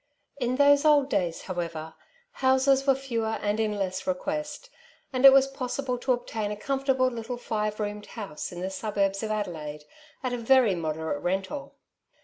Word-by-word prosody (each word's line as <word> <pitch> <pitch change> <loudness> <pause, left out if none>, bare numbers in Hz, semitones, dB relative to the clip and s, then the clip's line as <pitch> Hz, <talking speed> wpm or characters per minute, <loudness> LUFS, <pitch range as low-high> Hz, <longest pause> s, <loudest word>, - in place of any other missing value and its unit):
In 250 -1 0
those 285 +1 +5
old 295 -3 +4
days, 175 -4 -1
however, 165 -3 -5 0.4
houses 265 - +3
were 270 - +5
fewer 230 -5 -2
and 205 +1 0
in 215 -2 0
less 185 -1 -3
request, 300 - -3 0.4
and 255 +1 +2
it 270 - +12
was 270 0 +6
possible 270 -1 -3
to 255 - 0
obtain 225 -4 -2
a 210 - -3
com 270 +6 -3
fortable 260 -2 +2
little 235 +1 -5
five 215 -3 -2
roomed 210 0 -4
house 200 -9 -6
in 175 0 -7
the 190 +1 -3
suburbs 195 0 -1
of 220 - -3
Adelaide 160 -8 -4 0.4
at 255 -1 -1
a 245 - -2
very 240 -3 +4
moderate 160 -3 -3
rental. 190 +10 -3
225 Hz, 170 wpm, -27 LUFS, 190-265 Hz, 0.4 s, it